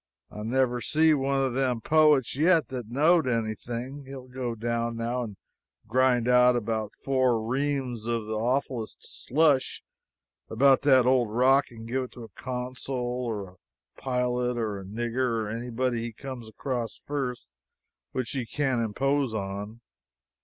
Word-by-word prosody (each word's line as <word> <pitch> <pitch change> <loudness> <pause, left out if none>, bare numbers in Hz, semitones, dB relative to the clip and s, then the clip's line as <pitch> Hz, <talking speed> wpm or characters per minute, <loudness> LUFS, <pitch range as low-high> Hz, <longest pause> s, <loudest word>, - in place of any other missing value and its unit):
I 105 - -7
never 125 +2 +1
see 160 +3 +4
one 135 -1 +1
of 130 -2 0
them 130 -2 +1
poets 150 -1 +4
yet 165 +2 +3
that 125 -4 -5
knowed 155 +4 +3
anything. 120 +4 -3
He'll 135 -1 -9
go 125 -2 -4
down 115 +1 -2
now 120 +2 -1
and 105 -5 -6 0.5
grind 125 -1 +3
out 125 0 +6
about 110 -2 -2
four 130 -4 +2
reams 130 -1 -2
of 115 -2 -1
the 110 - -4
awfullest 120 0 -1
slush 145 -1 +1 0.7
about 135 +4 +4
that 130 -3 +5
old 125 -3 +3
rock 130 +5 +4
and 115 -1 -10
give 130 +2 -1
it - - -13
to 120 - -9
a 110 - -10
consul, 130 +4 -5
or 120 -5 -2
a 90 - -16 0.5
pilot, 125 -1 0
or 105 -4 -2
a - - -8
nigger, 115 +2 -1
or 105 - -4
anybody 120 +1 -1
he 115 0 -5
comes 125 -1 -8
across 120 -1 -3
first 135 - -4 0.7
which 130 -2 -3
he 130 -4 -3
can 135 -1 0
impose 135 +3 0
on. 100 +3 -5
125 Hz, 155 wpm, -27 LUFS, 115-130 Hz, 0.7 s, out